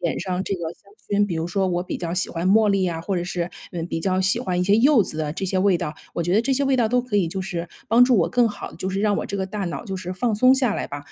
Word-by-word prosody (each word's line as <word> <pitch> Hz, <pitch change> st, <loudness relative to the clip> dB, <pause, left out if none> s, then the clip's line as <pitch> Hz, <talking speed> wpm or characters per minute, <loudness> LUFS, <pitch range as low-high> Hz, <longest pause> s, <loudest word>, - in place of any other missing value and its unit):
点 170 Hz, -2 st, -1 dB
上 185 Hz, 0 st, -2 dB
这 195 Hz, -, -2 dB
个 180 Hz, -, -7 dB
香 200 Hz, -, -23 dB
薰。 205 Hz, -1 st, 0 dB
比 180 Hz, -, -3 dB
如 160 Hz, 0 st, -2 dB
说 190 Hz, +3 st, 0 dB
我 175 Hz, -1 st, 0 dB
比 185 Hz, -, -4 dB
较 170 Hz, -1 st, -4 dB
喜 180 Hz, -, 0 dB
欢 170 Hz, +2 st, -1 dB
茉 215 Hz, +1 st, +5 dB
莉 195 Hz, -2 st, +2 dB
啊， 165 Hz, -2 st, -3 dB
或 190 Hz, +3 st, -2 dB
者 175 Hz, -, -1 dB
是， 175 Hz, -1 st, -3 dB, 0.2 s
嗯， 170 Hz, -2 st, -3 dB
比 165 Hz, -, -2 dB
较 185 Hz, +2 st, +1 dB
喜 190 Hz, +4 st, +2 dB
欢 185 Hz, -7 st, -2 dB
一 180 Hz, -, +2 dB
些 200 Hz, +3 st, +4 dB
柚 255 Hz, 0 st, +5 dB
子 155 Hz, -, -5 dB
的 150 Hz, -1 st, -2 dB
这 190 Hz, -, -4 dB
些 190 Hz, 0 st, 0 dB
味 190 Hz, -1 st, +3 dB
道， 170 Hz, -3 st, -4 dB, 0.2 s
我 170 Hz, -, -1 dB
觉 175 Hz, +2 st, -1 dB
得 210 Hz, -, +4 dB
这 260 Hz, +4 st, 0 dB
些 275 Hz, +2 st, +1 dB
味 270 Hz, -1 st, +2 dB
道 235 Hz, -3 st, +2 dB
都 250 Hz, +2 st, +2 dB
可 240 Hz, -4 st, -2 dB
以 195 Hz, -4 st, +3 dB
就 190 Hz, +3 st, -4 dB
是 175 Hz, -2 st, -4 dB, 0.2 s
帮 235 Hz, +2 st, +6 dB
助 250 Hz, -1 st, +3 dB
我 175 Hz, -, +2 dB
更 245 Hz, -2 st, +3 dB
好 210 Hz, -, -7 dB
地 -, -, -13 dB
就 190 Hz, -, -3 dB
是 195 Hz, +1 st, -2 dB
让 205 Hz, -1 st, +2 dB
我 -, -, -3 dB
这 200 Hz, -, -4 dB
个 190 Hz, -, -1 dB
大 195 Hz, +1 st, -4 dB
脑 175 Hz, +6 st, -5 dB
就 195 Hz, -4 st, -4 dB
是 180 Hz, 0 st, -5 dB
放 230 Hz, +5 st, -1 dB
松 255 Hz, +5 st, +5 dB
下 260 Hz, -5 st, +1 dB
来 -, -, -3 dB
吧。 145 Hz, -, -6 dB
190 Hz, 360 characters per minute, -23 LUFS, 175-215 Hz, 0.2 s, 帮